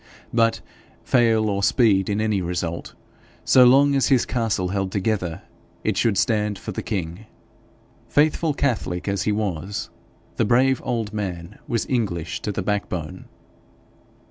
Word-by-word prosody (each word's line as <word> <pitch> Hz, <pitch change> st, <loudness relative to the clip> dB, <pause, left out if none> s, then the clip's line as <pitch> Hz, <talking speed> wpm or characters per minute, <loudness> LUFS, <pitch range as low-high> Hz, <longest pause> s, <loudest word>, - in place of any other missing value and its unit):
But, 115 Hz, -1 st, +2 dB, 0.4 s
fail 115 Hz, -3 st, +3 dB
or 100 Hz, -1 st, -1 dB
speed 100 Hz, -3 st, +3 dB
in 105 Hz, +1 st, 0 dB
any 110 Hz, -3 st, 0 dB
result, 85 Hz, -1 st, -4 dB, 0.5 s
so 130 Hz, -1 st, +7 dB
long 140 Hz, +3 st, +5 dB
as 135 Hz, -1 st, +2 dB
his 130 Hz, -4 st, +3 dB
castle 110 Hz, -7 st, -1 dB
held 95 Hz, 0 st, -2 dB
together, 95 Hz, -4 st, -2 dB, 0.4 s
it -, -, 0 dB
should 110 Hz, -4 st, +1 dB
stand 105 Hz, +2 st, +1 dB
for 110 Hz, -, -7 dB
the -, -, -4 dB
king. 95 Hz, 0 st, -4 dB, 0.8 s
Faithful 155 Hz, +1 st, +2 dB
catholic 110 Hz, -11 st, -1 dB
as 100 Hz, -2 st, 0 dB
he 105 Hz, -, 0 dB
was, 100 Hz, -1 st, -3 dB, 0.5 s
the -, -, +2 dB
brave 130 Hz, +4 st, +3 dB
old 115 Hz, -5 st, -2 dB
man 95 Hz, -2 st, -5 dB
was 115 Hz, -, -1 dB
English 105 Hz, -4 st, -2 dB
to 105 Hz, -, -2 dB
the -, -, -3 dB
backbone. 90 Hz, -6 st, -3 dB
105 Hz, 145 wpm, -23 LUFS, 95-115 Hz, 0.8 s, so